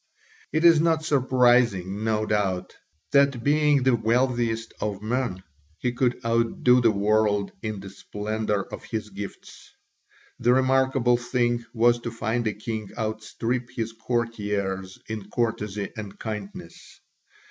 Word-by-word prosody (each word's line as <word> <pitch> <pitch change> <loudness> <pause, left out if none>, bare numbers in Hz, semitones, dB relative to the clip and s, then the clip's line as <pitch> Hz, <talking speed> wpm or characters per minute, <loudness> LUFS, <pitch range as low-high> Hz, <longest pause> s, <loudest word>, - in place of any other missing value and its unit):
It 155 +3 +1
is 165 -2 +7
not 160 -1 +2
surprising, 120 - +3
no 110 -1 +1
doubt, 95 -4 -1 0.4
that 140 -4 +3
being 145 -1 +3
the 130 -1 +4
wealthiest 115 0 0
of 105 -1 -3
men, 115 -5 -2 0.3
he 125 - -1
could 125 0 +1
outdo 115 +2 +3
the 115 - +5
world 105 -1 +2
in 110 -2 -4
the 100 -1 -9
splendour 105 0 -2
of - - -7
his 105 -2 -5
gifts. 100 +1 -9 0.7
The 120 +1 +4
remarkable 130 -1 +3
thing 120 -1 0
was 120 0 +3
to 120 - -4
find 115 +1 -2
a 105 - 0
king 110 0 -5
outstrip 115 +3 -3
his 115 -1 -3
courtiers 105 -5 -2
in 110 -2 -6
courtesy 105 -3 -2
and 105 -3 -7
kindness. 105 -3 -8
115 Hz, 130 wpm, -25 LUFS, 105-125 Hz, 0.7 s, is